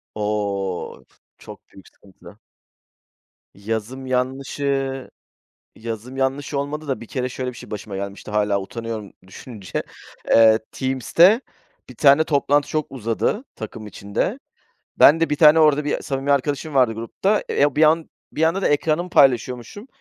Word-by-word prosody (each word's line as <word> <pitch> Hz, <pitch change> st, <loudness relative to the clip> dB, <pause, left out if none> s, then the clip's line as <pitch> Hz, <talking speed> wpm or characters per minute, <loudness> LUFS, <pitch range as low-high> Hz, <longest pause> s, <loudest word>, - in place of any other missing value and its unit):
O, 100 Hz, -3 st, -3 dB, 0.3 s
çok -, -, -13 dB
büyük 95 Hz, -, -16 dB
sıkıntı. 95 Hz, -2 st, -18 dB, 1.2 s
Yazım 110 Hz, +6 st, -5 dB
yanlışı 135 Hz, +1 st, -2 dB, 0.7 s
yazım 115 Hz, +3 st, -7 dB
yanlışı 140 Hz, +2 st, -1 dB
olmadı 150 Hz, +2 st, -5 dB
da 135 Hz, -, -2 dB
bir -, -, -8 dB
kere 130 Hz, +1 st, -3 dB
şöyle 130 Hz, 0 st, -4 dB
bir -, -, -15 dB
şey -, -, -12 dB
başıma 105 Hz, -1 st, -6 dB
gelmişti 100 Hz, +2 st, -6 dB
hâlâ 105 Hz, -1 st, +1 dB
utanıyorum 110 Hz, 0 st, -6 dB, 0.2 s
düşününce. 100 Hz, +1 st, -7 dB, 0.5 s
Eee, 110 Hz, -1 st, +6 dB
Teams'te 165 Hz, -, +3 dB, 0.5 s
bir 125 Hz, -, -12 dB
tane 140 Hz, +5 st, +5 dB
toplantı 145 Hz, -1 st, +1 dB
çok 155 Hz, -1 st, -1 dB
uzadı 125 Hz, -, -2 dB
takım 110 Hz, 0 st, -8 dB
içinde. 100 Hz, -, -3 dB, 0.6 s
Ben 160 Hz, +2 st, +7 dB
de 165 Hz, -, +1 dB
1 150 Hz, -, +1 dB
tane, 155 Hz, +1 st, +6 dB
orada 150 Hz, -2 st, +4 dB
bir 150 Hz, -, -1 dB
samimi 135 Hz, +1 st, -2 dB
arkadaşım 145 Hz, +2 st, -1 dB
vardı 125 Hz, -4 st, +4 dB
grupta. 155 Hz, -, -1 dB
Eee, -, -, -2 dB
ya, 145 Hz, -1 st, +3 dB
bir 155 Hz, -, +4 dB
an 160 Hz, +1 st, +3 dB, 0.2 s
bir 155 Hz, -, -1 dB
anda 165 Hz, +4 st, +2 dB
da -, -, +2 dB
ekranımı 155 Hz, +4 st, 0 dB
paylaşıyormuşum. 130 Hz, -, +1 dB
130 Hz, 145 wpm, -21 LUFS, 110-150 Hz, 1.2 s, Ben